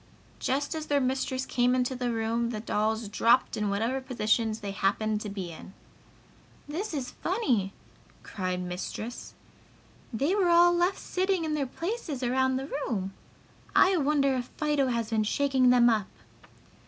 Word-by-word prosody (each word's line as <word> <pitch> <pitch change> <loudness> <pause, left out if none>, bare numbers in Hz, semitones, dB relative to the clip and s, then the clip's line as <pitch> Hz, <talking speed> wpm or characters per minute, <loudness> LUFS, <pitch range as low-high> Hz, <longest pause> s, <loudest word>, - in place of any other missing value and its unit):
Just 280 +4 -1
as 310 -1 -5
their 290 -1 +2
mistress 260 0 -1
came 245 +1 +2
into 255 0 0
the 245 -1 -1
room 230 +1 -1
the 220 -3 -4
dolls 220 +1 -1
dropped 230 +5 +3
in 210 -1 -1
whatever 225 +7 -1
positions 225 -3 0
they 200 -1 -4
happened 210 +2 0
to 210 - -4
be 190 -4 -5
in. 180 +4 -12 0.9
"This 355 +9 -4
is 275 -5 -4
funny!" 255 - 0 0.5
cried 185 -2 -3
Mistress. 180 +6 -6 0.8
"They 275 - 0
were 390 -4 +2
all 345 +1 +6
left 350 +2 +1
sitting 370 -2 -1
in 310 - -1
their 285 -3 -1
places 330 - -4
around 260 +1 +2
the 265 +1 -2
room! 210 -10 -3 0.6
I 380 0 +6
wonder 280 -2 +2
if 250 -1 -2
Fido 295 -3 +1
has 235 -2 -2
been 220 -1 +2
shaking 265 +2 +2
them 245 -1 +6
up!" 215 -4 +2
250 Hz, 155 wpm, -28 LUFS, 220-290 Hz, 0.9 s, all